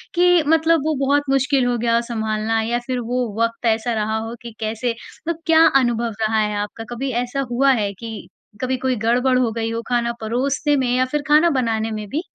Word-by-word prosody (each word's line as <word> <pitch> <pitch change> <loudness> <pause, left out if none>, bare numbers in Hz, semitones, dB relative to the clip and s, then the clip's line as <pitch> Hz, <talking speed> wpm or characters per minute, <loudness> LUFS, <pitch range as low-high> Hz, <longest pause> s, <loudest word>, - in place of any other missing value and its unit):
कि 355 -1 +4
मतलब 325 0 +3
वो 315 -1 +1
बहुत 285 +1 +2
मुश्किल 270 -1 +2
हो 245 0 +1
गया 230 0 +1
हो 235 - +3
संभालना? 220 0 -1
या 235 +2 -1
फिर 255 -1 -1
वो 245 +1 -1
वक़्त 230 +1 -1
ऐसा 230 +1 +1
रहा 220 0 -1
हो 225 +1 -5
कि 235 - -8
कैसे 225 +2 -2 0.4
मतलब 335 -1 -2
क्या 325 0 +6
अनुभव 240 -3 +2
रहा 220 0 +1
है 210 -1 0
आपका? 210 +2 -6
कभी 255 +3 -3
ऐसा 250 +3 -3
हुआ 270 +3 +3
है 200 -1 -1
कि 220 +2 -8 0.3
कभी 260 0 -1
कोई 260 0 0
गड़बड़ 245 +3 +2
हो 240 -3 +1
गई 225 0 -3
हो, 230 0 -3
खाना 235 -1 0
परोसने 270 +6 0
में 260 -3 0
या 255 0 +2
फिर 295 +3 -2
खाना 305 +3 +5
बनाने 225 -2 -1
में 215 -1 -5
भी? 300 +9 -2
240 Hz, 215 wpm, -20 LUFS, 225-270 Hz, 0.4 s, क्या